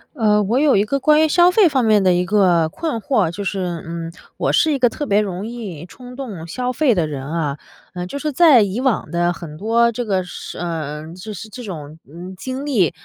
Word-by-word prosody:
呃， 210 -4 +3
我 230 +6 +1
有 295 -1 +4
一 200 - +4
个 275 +6 -1
关 305 +2 +4
于 - - +4
消 350 +3 +5
费 390 0 +5
方 270 -5 +1
面 215 -2 +4
的 185 -1 +4
一 175 0 +1
个 180 -4 +3
困 315 - -3
惑， 205 -7 +1
就 200 +3 -6
是， 180 -4 -3
嗯， 165 0 -6 0.3
我 - - 0
是 320 - +3
一 285 - +1
个 250 -2 +4
特 290 +5 -4
别 205 -2 +3
容 195 0 -4
易 200 -9 -7
冲 250 +5 -12
动 220 -12 -7
消 250 +9 -3
费 255 0 +2
的 170 -6 0
人 135 -3 -6
啊。 150 -2 -2 0.4
呃， 180 0 -4
就 280 - -6
是 300 +1 -2
在 295 -4 +6
以 200 +3 -2
往 260 -5 0
的 175 0 +1
很 165 -3 -9
多 230 +6 +2
这 245 +2 -3
个 195 -5 0
事 180 - -8
呃， 160 -2 -5
就 185 +4 -8
是 210 +2 -8
这 245 +4 -9
种， 160 -6 -8
嗯， 180 +3 -9
经 260 +8 -5
历， 210 - +2
205 Hz, 250 characters per minute, -19 LUFS, 175-255 Hz, 0.4 s, 在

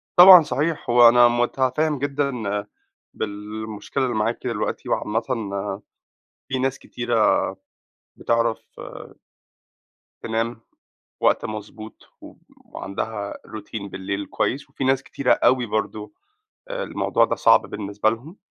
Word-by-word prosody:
طبعًا 180 -1 +11
صحيح، 150 -2 -2
هو 120 0 +8
أنا 120 0 +6
مُتفهِّم 130 +5 0
جدًا 140 0 -1 0.8
بالمشكلة 105 +4 -5
اللي 125 -2 -1
معاكِ 110 +2 0
دلوقتي - - -3
وعامةً 110 +2 0 1.3
في 130 0 -2
ناس 135 0 -1
كتيرة 120 -2 +1 0.8
بتعرف 115 -1 0 1.7
تنام 115 +1 -2 0.6
وقت - - +2
مضبوط 110 0 -8
و - - -12 0.3
وعندها 100 +1 -5
روتين 105 -1 -7
بالليل 100 +1 -4
كويس 135 +8 -2
وفي 135 - -4
ناس 135 0 +2
كتيرة 130 -3 0
أوي 125 -2 +3
برضه 110 0 -3 0.6
آآ - - -4
الموضوع - - +1
ده - - -1
صعب - - +5
بالنسبة 105 +1 -1
لهم، 130 - -8
115 Hz, 110 wpm, -23 LUFS, 110-135 Hz, 1.7 s, طبعًا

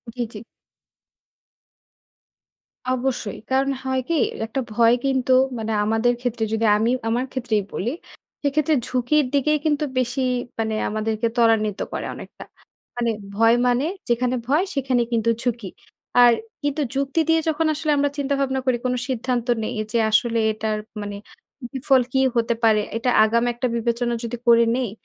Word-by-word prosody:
জি, 245 - -3
জি। - - -7 2.6
অবশ্যই। 255 -5 -2
কারণ 270 +1 +2
হয় 260 0 0
কি 335 - +1 0.3
একটা 245 +4 -3
ভয় 230 +1 +5
কিন্তু 260 -1 +2 0.2
মানে 225 0 -3
আমাদের 225 +3 +2
ক্ষেত্রে 240 -2 -2
যদি 220 +1 +1
আমি 225 +3 +1 0.2
আমার 240 +3 0
ক্ষেত্রেই 235 -5 -1
বলি, 225 +6 -2 0.5
সেক্ষেত্রে 300 +2 +1
ঝুঁকির 260 +4 +1
দিকেই 300 +2 +2
কিন্তু 300 -1 +1 0.2
বেশি 255 +2 -1 0.4
মানে 220 -1 -1
আমাদেরকে 215 +1 -1
ত্বরান্বিত 225 -3 +2
করে - - -3
অনেকটা। - - -10 0.5
মানে 235 -1 0 0.2
ভয় 225 +2 +5
মানে 245 +4 +2 0.2
যেখানে 245 +1 +1
ভয়, 295 +7 +3
সেখানে 260 -3 +1
কিন্তু 230 -1 +1
ঝুঁকি। 235 -5 -2 0.5
আর 240 -1 +7 0.3
কিন্তু 290 +1 -1
যুক্তি 275 +3 +1
দিয়ে 325 0 +4
যখন 320 +1 0
আসলে 305 0 -1
আমরা 285 0 +2
চিন্তা 285 0 -1
ভাবনা 265 -1 0
করি 255 -2 +2
কোন 250 - +1
সিদ্ধান্ত 250 -1 -2 0.2
নেই - - -3 0.2
যে, 235 - +1
আসলে 230 +1 +2
এটার 215 0 -2 0.2
মানে 205 0 -5 0.6
বিফল 265 0 +3
কি 265 - +3 0.2
হতে 235 0 +1
পারে। 220 -2 +4 0.2
এটা 235 +2 0
আগাম 235 +2 +2
একটা 245 +2 -2
বিবেচনা 235 +1 -1
যদি 235 +1 -4
করে 235 0 +6
নেই, 255 -4 -1
245 Hz, 150 wpm, -22 LUFS, 225-270 Hz, 2.6 s, আর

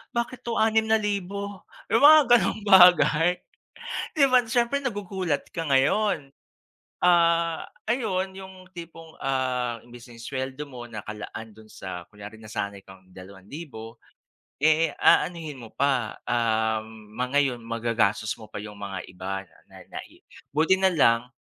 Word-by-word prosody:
bakit 235 +2 -2
'to 235 - -1
₱6,000 205 -3 0 0.3
yung 230 - +4
mga 310 +1 +9 0.2
ganung 210 +3 -2
bagay. 180 -3 +6 0.8
Di 285 -3 +4
ba? 255 -2 +4
Siyempre 240 +4 0
nagugulat 190 - -3
ka 165 - -2
ngayon. 140 +1 +1 0.7
Ah, 170 -1 +3 0.2
ayun 195 -6 -1
yung 190 0 -10 0.2
tipong 165 -2 -11
ah, 125 -3 -2
imbis 120 0 -14
na 115 -2 -13
sweldo 130 +2 -5
mo 120 -2 -9
nakalaan 110 0 -8
dun 110 +1 -17
sa 95 -4 -8
kunyari 105 +1 -12
nasanay 100 -2 -5
kang 95 -1 -16
₱2,000 110 - -11 0.6
eh, 155 +2 +3
aanhin 160 -6 +2
mo 115 -2 -11
pa 130 -6 0
um 110 -2 -1
ma 125 +2 -2
ngayon 135 -3 +1
magagastos 115 -2 0
mo 110 - -11
pa - - -6
yung 105 0 -8
mga 100 -1 -5
iba 95 +1 -5 0.3
na - - -14
nai - - -10 0.3
buti 175 +5 +3
na 190 - +5
lang. 125 -8 +2
135 Hz, 130 wpm, -25 LUFS, -, 0.8 s, mga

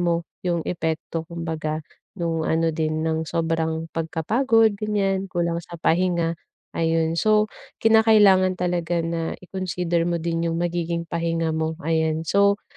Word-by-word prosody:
mo 170 -1 +1 0.2
yung 170 -2 -1
epekto 160 -1 -3
kumbaga, 160 -2 -4 0.3
nung 165 -2 -1
ano 165 0 +2
din 155 0 -1
ng 160 0 0
sobrang 165 -1 -1
pagkapagod, 220 - +2
ganyan, 195 -2 -1
kulang 170 -2 -1
sa 170 - -10
pahinga. 170 0 +1 0.4
Ayun, 165 0 0
so, 215 0 +3 0.3
kinakailangan 210 -4 +5
talaga 175 -1 -1
na 165 0 -2
i-consider 180 -2 -2
mo 170 -2 -1
din 170 0 -1
yung 165 - -2
magiging 170 -1 -1
pahinga 165 -1 -1
mo, 160 0 -1
ayan. 160 0 0
So 200 +3 +2
170 Hz, 130 wpm, -23 LUFS, 160-185 Hz, 0.4 s, kinakailangan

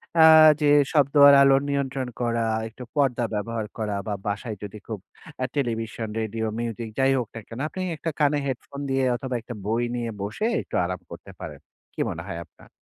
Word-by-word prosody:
অ্যাঁ 160 -1 +9
যে 150 - +3 0.3
শব্দ 140 -3 +3
আর 140 - +9
আলোর 135 0 +5
নিয়ন্ত্রণ 135 -2 -1
করা, 115 -1 0 0.2
একটু 115 +3 -10
পর্দা 135 -4 +2
ব্যবহার 110 +1 -2
করা 105 -2 -2
বা 105 - -1
বাসায় 105 +2 -3
যদি 105 +1 -7
খুব 110 -3 -5 0.4
অ্যাঁ 130 0 -2
টেলিভিশন, 115 -4 -2
রেডিও, 110 0 -2
মিউজিক 115 -1 -4
যাইহোক 135 -3 +2
না 115 - -6
কেনো 115 +3 -7
আপনি 185 - -6 0.2
একটা 165 +2 -3
কানে 145 0 +3
হেডফোন 135 +1 -5
দিয়ে 135 0 +1
অথবা 130 +1 -4
একটা 120 +1 -8
বই 115 +3 0
নিয়ে 120 -1 -2
বসে 105 - -3 0.2
একটু - - -8
আরাম 90 +1 -4
করতে - - -10
পারেন। - - -8 0.3
কি - - -12
মনে - - -5
হয় 85 - -4
আপনার? 80 - -21
120 Hz, 185 wpm, -25 LUFS, 110-135 Hz, 0.4 s, অ্যাঁ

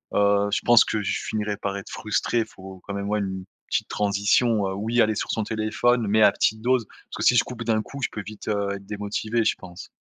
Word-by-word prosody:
heu, 100 0 +3
je - - +2
pense 120 -1 +6
que 110 - -1
je 100 - -2
finirai 105 -1 -2
par 100 0 -3
être 100 - -8
frustré. 110 +2 -1
Il - - -2
faut 95 -1 -12
quand 100 - -5
même, 100 0 -3
ouais, 105 - +1
une 95 -2 -4 0.2
petite - - -1
transition, 105 +1 +2
heu, - - -3
oui 115 +4 +1
aller 110 -1 +2
sur - - -2
son 110 - -1
téléphone 110 +3 +1
mais 110 +2 +3
à 105 - +7
petite 110 +2 0
dose, 125 0 +2
parce - - -14
que - - -3
si 125 - +5
je 120 - +5
coupe 120 -2 -7
d'un 110 -1 +1
coup, 140 +5 -9
je - - +1
peux 105 - -5
vite, 105 +1 -10
heu, 100 -2 0
être 100 0 -10
démotivé 105 +3 -2
je 110 - +2
pense. 90 -2 -11
105 Hz, 250 wpm, -24 LUFS, 100-110 Hz, 0.2 s, à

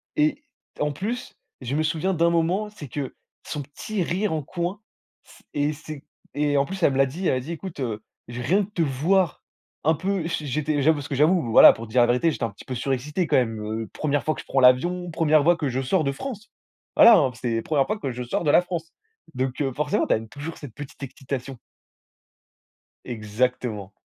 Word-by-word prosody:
et 300 -1 +1 0.4
en 150 0 +1
plus, 215 - -4 0.3
je 130 +2 -3
me 155 - +1
souviens 165 +4 0
d'un 170 0 +3
moment, 175 +5 +1
c'est 185 -9 -10
que 135 +1 -5 0.3
son 150 - -4
petit 175 +8 -4
rire 190 +3 -1
en 155 -2 -2
coin, 180 +6 -4 0.4
c - - -19
et 145 +1 0
c'est 155 -1 -9 0.3
et 145 0 +1
en 140 - +3
plus, 195 +3 -6
elle 140 - +4
me - - -1
l'a 135 - +5
dit, 170 +8 -3
elle - - +3
a - - 0
dit: 155 +7 -7
«Écoute, 170 -3 -6
heu, 110 -3 -3 0.3
j 120 - -6
rien 175 +12 +2
que 190 - -8
de 210 - -35
te 170 - 0
voir, 160 +5 +1 0.4
un 160 +2 +4
peu», 190 0 -1
j'é 155 -3 -3
j'étais 145 +2 0
j'avoue 160 +3 +4
parce 145 -1 -6
que 140 - -2
j'avoue, 165 +6 +4
voilà, - - +10
pour 115 0 -8
te - - -14
dire 125 +1 +4
la 120 - +5
vérité, 125 +7 +2
j'étais - - -5
un 110 - -4
petit 100 - -14
peu 130 - -5
surexcité, 140 +7 -1
quand - - +2
même. 115 -3 0
Heu, 110 +1 -4
1re 145 -1 -1
fois 155 - +1
que - - -9
je - - -19
prends 135 - +1
l'avion, 175 +8 +3
1re 155 -2 +3
fois 170 +1 +4
que 150 - -1
je 130 +1 -1
sors 160 +6 +1
de 140 - +1
France! 225 - -7 0.5
Voilà, 235 -2 +9
hein, 130 -3 +2
c'était 120 -1 -2
la - - -1
1re 145 -4 +2
fois 215 0 -2
que 135 - -3
je 125 +1 -5
sors 120 - -2
de 145 - +4
la - - +6
France. 170 -2 -5 0.4
Donc 130 +2 -2
heu, 135 -2 0
forcément, 150 +1 0
tu - - +3
as - - +3
une 110 0 -9
toujours 145 +3 -7
cette 140 -7 -10
petite 145 -1 -9
excitation. 135 -1 -6 1.5
Exactement. 110 -2 -2
145 Hz, 235 wpm, -24 LUFS, 130-170 Hz, 1.5 s, voilà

